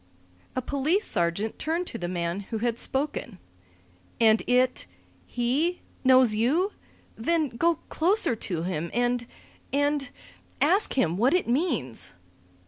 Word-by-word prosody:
A 255 - -1
police 300 - 0
sergeant 175 +6 -1
turned 335 +3 -1
to 230 - -6
the 175 - -3
man 175 +1 -2
who 225 - -2
had 235 +1 -1
spoken. 265 -6 -2 0.8
"And 220 -1 +5
it 250 - +2 0.4
he 275 +9 0 0.2
knows 255 -3 +6
you? 290 - +1 0.4
Then 315 +5 0
go 335 +9 +1
closer 350 - +2
to 175 -6 -3
him, 170 -2 -3
and 245 0 0 0.4
and 285 -1 +1 0.5
ask 395 +4 +3
him 175 -10 +1
what 250 - +3
it 360 - +1
means." 235 - -1
245 Hz, 130 wpm, -26 LUFS, 215-300 Hz, 0.8 s, knows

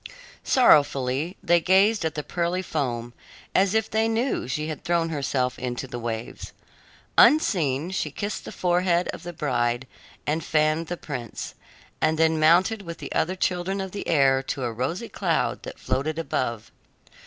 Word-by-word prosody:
Sorrowfully 145 - +3
they 175 +1 +4
gazed 195 +4 +3
at 160 -1 -2
the 150 - -3
pearly 175 +3 -1
foam, 120 -8 -3 0.4
as 195 +2 +3
if 220 0 +2
they 220 +1 +1
knew 225 - -1
she 150 +4 -2
had 155 -2 -6
thrown 170 -1 +1
herself 135 -4 -1
into 125 +1 -3
the 120 -2 -6
waves. 115 -1 -5 0.7
Unseen 170 - +4
she 195 - -1
kissed 205 0 -4
the - - -8
forehead 180 0 +1
of - - -5
the 175 - -6
bride 120 -6 -1 0.4
and 155 +2 -1
fanned 155 +2 +1
the 175 - -4
prince, 125 -9 -6 0.5
and 155 0 +2
then 160 0 +3
mounted 180 +7 +4
with 170 -3 -7
the - - -7
other 180 +4 0
children 185 +1 -1
of 190 -1 -4
the 200 - -6
air 135 -4 +4
to 135 0 -4
a 120 -2 -2
rosy 160 - -3
cloud 170 -8 -1
that - - -8
floated 155 +4 -2
above. 125 -8 -2
160 Hz, 165 wpm, -25 LUFS, 135-185 Hz, 0.7 s, they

